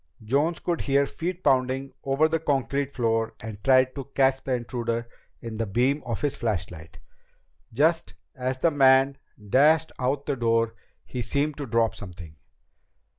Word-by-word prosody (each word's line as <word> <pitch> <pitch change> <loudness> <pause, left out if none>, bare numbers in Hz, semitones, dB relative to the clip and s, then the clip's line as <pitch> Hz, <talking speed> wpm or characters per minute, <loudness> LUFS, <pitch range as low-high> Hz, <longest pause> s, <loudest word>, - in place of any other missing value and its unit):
Jones 145 +9 +1
could 170 -2 -2
hear 140 0 +2
feet 180 +5 -5
pounding 130 0 +1
over 135 +3 +2
the 165 +1 0
concrete 140 -2 -1
floor 115 -3 0
and 105 -2 -8
tried 130 -1 +4
to 135 -2 -6
catch 135 -1 +3
the 130 - 0
intruder 120 -1 -3 0.3
in 115 -2 -6
the 115 0 -2
beam 125 +8 +1
of 115 -3 -3
his 145 -2 0
flashlight. 90 -8 -4 0.7
Just 160 +8 +1 0.2
as 130 0 -3
the 165 +5 +2
man 135 -1 +4 0.3
dashed 155 +4 +4
out 135 +2 -1
the 145 - -1
door, 115 -2 +1 0.3
he 125 - -5
seemed 145 +4 -1
to 145 -2 -5
drop 115 -1 +2
something." 85 -6 -10
130 Hz, 155 wpm, -26 LUFS, 115-140 Hz, 0.7 s, tried